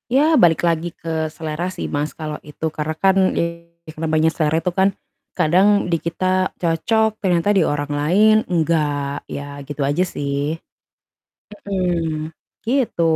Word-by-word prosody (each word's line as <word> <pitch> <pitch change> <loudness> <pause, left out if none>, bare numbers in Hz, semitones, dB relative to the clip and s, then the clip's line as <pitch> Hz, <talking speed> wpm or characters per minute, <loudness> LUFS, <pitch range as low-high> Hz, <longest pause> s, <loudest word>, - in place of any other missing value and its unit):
ya, 280 - +5 0.2
balik 170 -3 +4
lagi 170 0 0
ke 160 -1 -3
selera 160 +2 -4
sih - - -4
Mas, 145 +1 -2
kalau 155 -2 -5
itu 150 +2 -7
karena 155 +1 -3
kan 190 0 +5 0.2
ya 170 0 -2 0.3
karena 160 0 -4
banyak 160 +1 +3
selera 155 -1 +1
itu 180 - 0
kan, 195 +1 +5 0.5
kadang 180 +6 +4 0.2
di 170 - +3
kita 170 +2 -3 0.4
cocok, 220 +7 +2
ternyata 180 -1 +1
di - - +5
orang 145 0 -2
lain 200 +9 +4
enggak, 150 -4 0
ya 140 - -5 0.2
gitu 145 0 -5
aja 145 +6 +1
sih, 145 +1 -2 1.1
mhm, 165 -5 -1 0.3
gitu. 245 -7 0
165 Hz, 145 wpm, -20 LUFS, 150-180 Hz, 1.1 s, ya